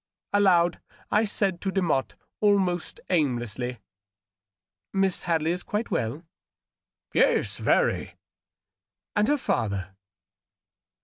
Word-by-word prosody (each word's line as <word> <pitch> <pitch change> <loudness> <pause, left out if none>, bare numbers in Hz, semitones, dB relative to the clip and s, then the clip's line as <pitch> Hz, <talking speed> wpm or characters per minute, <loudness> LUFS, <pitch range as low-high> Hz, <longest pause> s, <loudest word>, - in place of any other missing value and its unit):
Aloud 180 -4 +4 0.3
I 215 +2 +4
said 195 -4 -1
to 195 - -1
Demotte, 175 -9 0 0.2
almost 190 -5 +1
aimlessly, 125 - -1 0.4
— 95 0 -67
" 95 - -67 0.3
Miss 195 -2 +1
Hadley 165 -2 +1
is 180 +1 -2
quite 210 +5 -3
well 120 +8 -2 0.5
?" - - -46
"Yes— - - +2
very." - - +1 1.0
"And 210 +1 +3
her 295 - +3
father?" 100 - -2
175 Hz, 110 wpm, -26 LUFS, 120-195 Hz, 1.0 s, Aloud